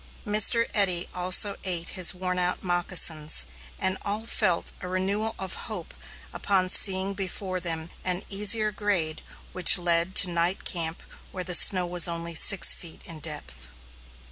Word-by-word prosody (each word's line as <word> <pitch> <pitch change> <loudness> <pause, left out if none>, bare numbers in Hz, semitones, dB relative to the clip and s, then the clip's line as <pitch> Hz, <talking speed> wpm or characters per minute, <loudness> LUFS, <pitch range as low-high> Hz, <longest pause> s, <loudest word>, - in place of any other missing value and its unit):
Mr. 215 +2 +3
Eddy 185 -4 -1
also 185 +3 +3
ate 175 -2 -4
his 185 -3 +2
worn 180 0 -5
out 180 0 -4
moccasins, 175 -4 +1 0.3
and 190 -1 -2
all 210 +2 -2
felt 190 -7 -1
a - - -8
renewal 200 +4 -3
of 190 -1 -5 0.2
hope 195 -7 -7 0.4
upon 190 -2 -1
seeing 190 0 +3
before 190 -1 -6
them 165 -1 -4
an 180 0 -2
easier 210 +2 +2
grade 195 -7 -2 0.3
which 185 -2 +7
led 175 +1 -3
to - - +7
night 175 +2 -3
camp 165 -1 -5 0.3
where 185 - -7
the 180 - -5
snow 180 +2 +6
was 175 0 +2
only 170 0 -6
six 195 +4 +4
feet 165 -2 -11
in 165 -2 -8
depth. 105 - -6
180 Hz, 150 wpm, -24 LUFS, 170-195 Hz, 0.4 s, which